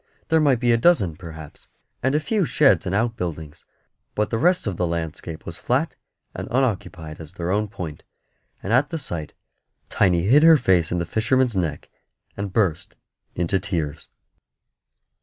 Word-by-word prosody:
There 160 0 +4
might 140 -6 +3
be 120 -1 +2
a 115 - +4
dozen, 115 - +3
perhaps, 80 -3 -11 0.3
and 130 +3 +1
a - - +4
few 205 +6 0
sheds 145 - +3
and 95 - -1
outbuildings, 90 -10 -3 0.5
but 105 - 0
the 115 - 0
rest 180 +6 +3
of 100 -4 -2
the 90 +1 0
landscape 80 -1 -5
was - - -7
flat - - 0 0.4
and - - -6
unoccupied 95 -11 -2
as 80 +1 -10
their 90 -1 -3
own 105 +2 +1
Point; 85 -7 -7 0.6
and 100 - -1
at 135 +4 +3
the 165 - -3
sight 85 - -6 0.5
Tiny 90 -3 +2
hid 130 +10 +5
her 165 0 +8
face 90 - +2
in 90 - 0
the 85 - -1
fisherman's 115 +5 +1
neck 80 -6 -3 0.4
and 100 -1 -4
burst 90 -6 0 0.4
into 90 +3 0
tears. 80 -7 -3
95 Hz, 165 wpm, -23 LUFS, 85-125 Hz, 0.6 s, her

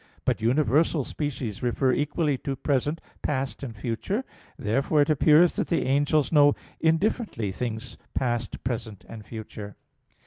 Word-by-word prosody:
But - - +1
universal 145 +5 +2
species 130 -8 -4
refer 125 +2 +1
equally 150 +1 +1
to 135 - -3
present, 145 +4 0 0.2
past, 135 -2 -2
and 120 -5 -6
future. 120 - -2 0.3
Therefore 135 +7 +2
it 145 - 0
appears 155 +4 +5
that - - 0
the 165 - +1
angels 145 +1 +2
know 145 -2 +6 0.2
indifferently 160 - +1
things 115 +3 -5 0.2
past, 120 -3 -1
present, 110 -5 -4
and 110 -2 -9
future. 105 -2 -8
135 Hz, 135 wpm, -26 LUFS, 115-150 Hz, 0.3 s, know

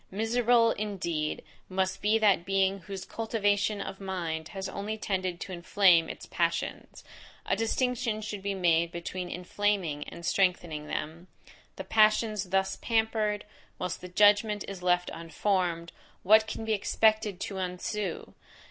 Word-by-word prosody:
Miserable, 230 +2 +3
indeed, 170 -7 -3 0.3
must 190 0 -1
be 210 +2 +3
that 205 -6 +3
being 195 +1 +1
whose 190 0 -7
cultivation 205 -2 0
of 195 - -6
mind 170 -5 -3
has 190 0 -5
only 205 +3 -4
tended 185 -4 -2
to 195 - -6
inflame 175 -1 +4
its - - -7
passions! 170 0 -2 0.4
A - - +1
distinction 235 0 0
should 210 -2 -5
be 200 0 -2
made 170 -2 +2
between 175 +1 -5
inflaming 180 -4 -1
and 170 0 -9
strengthening 175 -5 0
them. 165 +5 -5 0.5
The - - -6
passions 215 -2 +3
thus 190 +1 +1
pampered, 220 -2 0 0.3
whilst 180 -1 -4
the 180 - -8
judgment 205 +2 +4
is 195 -2 -7
left 180 0 +1
unformed, 170 0 -1 0.3
what 220 +3 +6
can 225 - -5
be 220 - +1
expected 215 -1 +2
to 195 -2 -4
ensue? 185 +1 -4
195 Hz, 140 wpm, -29 LUFS, 180-215 Hz, 0.5 s, what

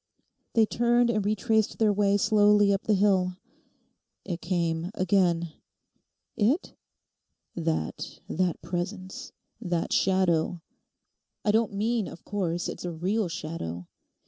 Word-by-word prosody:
They 225 -1 +5
turned 240 +2 +2
and 215 -3 0
retraced 215 +1 +1
their 215 -2 +3
way 200 0 +3
slowly 205 0 +4
up 195 - -2
the 215 - +3
hill. 190 -2 +2 0.9
'It 175 -3 -4
came 170 -1 -1
again.' 175 -3 +1 0.8
'It?' 245 - +1 0.8
'That—that 165 - -2
presence, 185 +8 -5 0.3
that 175 -5 -1
shadow. 180 -3 +2 0.9
I 210 - +4
don't 220 -1 +1
mean, 220 +1 0
of - - -11
course, 175 -4 -2
it's - - -6
a 175 - -3
real 190 +6 -1
shadow. 155 - -5
190 Hz, 115 wpm, -27 LUFS, 175-210 Hz, 0.9 s, They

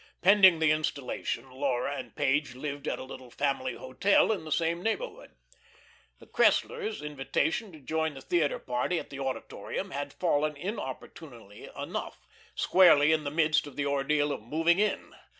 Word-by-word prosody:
Pending 190 -2 +7
the 160 -1 +3
installation 140 -4 -2
Laura 135 0 -1
and - - -8
Page 140 -2 0
lived 145 +1 -5
at - - -1
a - - -7
little 130 -1 -10
family 130 -1 -1
hotel 130 +13 +2
in 200 -7 -3
the 155 - -8
same 170 +1 0
neighbourhood. 455 - -4 0.8
The - - -16
Cresslers' 445 -2 +1
invitation 150 - -1
to 155 - -13
join 160 +2 -2
the 135 - -9
theatre 155 0 +1
party 125 +8 -2
at - - -6
the 140 - -7
Auditorium 135 -1 -4
had 145 0 -4
fallen 155 -3 0
inopportunely 130 - -8
enough, - - -6 0.3
squarely 155 -5 +5
in 155 -1 +1
the - - -1
midst 155 0 +2
of 145 - -11
the 145 - -1
ordeal 145 +1 +1
of - - -4
moving 165 - +1
in. 210 0 -1
150 Hz, 160 wpm, -29 LUFS, 135-170 Hz, 0.8 s, Pending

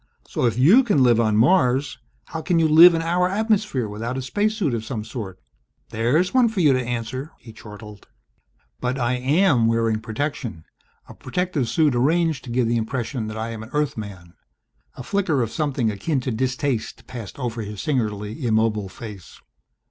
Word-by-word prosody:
So 125 - 0
if 115 - -1
you 180 - +6
can 200 - +2
live 120 -2 +4
on 110 -2 +2
Mars, 130 - +2 0.3
how 160 - -6
can 175 +1 0
you 165 -1 +4
live 165 +3 +8
in 165 - -1
our 180 +2 +1
atmosphere 210 - 0
without 115 +5 -4
a - - -2
space 205 - 0
suit 155 - 0
of 115 -2 -2
some 110 -1 -5
sort? 105 -6 -7 0.5
There's 125 +11 +1
one 250 -3 +4
for 220 -3 -4
you 150 -6 +5
to 130 - +1
answer!" 120 +4 -4
He 115 - -14
chortled. 105 -1 -12 0.7
"But 125 +1 -2
I 120 -1 0
am 130 -1 +2
wearing 115 -1 +1
protection 110 - -4 0.4
a - - -11
protective 180 -9 -2
suit 155 -5 +2
arranged 155 +3 +1
to - - -9
give 120 0 +1
the 120 +1 +1
impression 115 0 -3
that 110 0 -6
I 110 +1 -4
am 110 -1 -7
an 110 - -10
Earthman." 105 -12 -4 0.6
A 130 - -8
flicker 160 -4 0
of 115 - -4
something 135 -7 -1
akin 135 +9 -2
to 125 - -3
distaste 125 +1 -2
passed 115 -6 -9
over 120 -4 -4
his 105 -1 -7
singularly 110 -2 -2
immobile 110 -3 +1
face. 105 -3 -11
125 Hz, 180 wpm, -22 LUFS, 110-155 Hz, 0.7 s, live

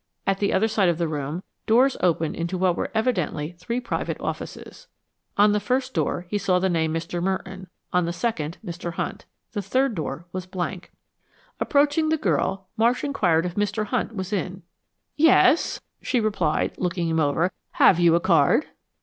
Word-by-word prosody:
At 195 0 +1
the 200 - +1
other 205 +4 +3
side 210 -4 +2
of 170 - 0
the 170 -1 0
room, 150 +3 -4 0.2
floors 250 +4 +4
opened 165 -3 +1
into 170 +2 -3
what 180 -1 +2
were - - -2
evidently 180 - 0
three 235 +6 -2
private 245 - -3
offices. - - -6 0.5
On 205 +1 +6
the 210 - +2
first 255 +3 -1
door 175 - -1
he 205 +3 -1
saw 185 -2 +2
the 190 +1 +1
name, 160 -2 +1
Mr. 170 +2 -3
Merton; 190 0 -3 0.3
on 180 -1 +3
the 170 - -1
second, 170 -5 -2
Mr. 170 0 -5
Hunt. - - -4 0.3
The 210 - -3
third 255 +6 +1
door 160 -2 -4
was 185 -1 -5
blank. 180 0 -4 0.7
Approaching 295 +2 +2
the 320 - +2
girl, 190 - 0
Marsh 235 +3 +2
inquired 180 - +2
if 175 - -3
Mr. 205 +2 -1
Hunt 230 0 -2
was 190 +1 -4
in. 185 -1 -3 0.5
"Yes," 315 -1 +4 0.2
she 250 - 0
replied, 200 -8 0
looking 175 -1 -1
him 160 0 +1
over. 155 +4 +1 0.2
"Have 175 - +5
you 170 -1 +5
a - - +4
card?" 170 - +3
185 Hz, 175 wpm, -24 LUFS, 170-220 Hz, 0.7 s, On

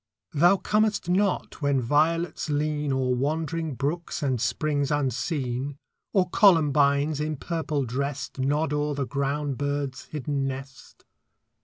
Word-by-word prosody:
Thou 175 +6 +5
comest 210 -2 +1
not 190 -2 0
when 140 -2 +2
violets 160 +6 +1
lean 150 0 0
O'er 130 -1 +1
wandering 155 +3 -1
brooks 155 +5 -3
and 130 -5 0
springs 140 +4 0
unseen, 135 0 -1 0.3
Or 185 -3 +3
columbines, 150 -6 +4
in 155 0 -1
purple 155 -2 -2
dressed, 140 +3 -3
Nod 145 +3 +1
o'er 150 0 0
the 140 -1 -1
ground 140 0 -2
bird's 145 -2 -2
hidden 145 -2 -2
nest. 135 0 -8
145 Hz, 125 wpm, -26 LUFS, 135-160 Hz, 0.3 s, Thou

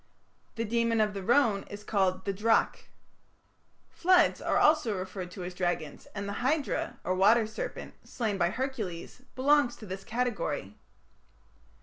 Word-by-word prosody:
The 230 0 -2
demon 230 0 +1
of 210 -1 +2
the 200 - -5
Rhone 230 -1 +3
is 205 0 -8
called 190 -3 0
the 200 - -1
"drac". 225 +4 +1 1.0
Floods 360 0 +3
are - - +1
also 300 -10 +3
referred 185 -1 -5
to 180 0 -8
as 180 +1 -6
dragons, 175 -4 -3
and 200 0 -4
the 200 - -4
Hydra, 305 +4 -1
or 185 - 0
water 215 +5 +4
serpent, 220 +1 -6
slain 215 -6 -3
by 170 -1 +3
Hercules, 230 -5 -5
belongs 280 -1 +3
to 215 - -11
this 190 0 -6
category. 215 - -2
210 Hz, 145 wpm, -29 LUFS, 190-245 Hz, 1.0 s, water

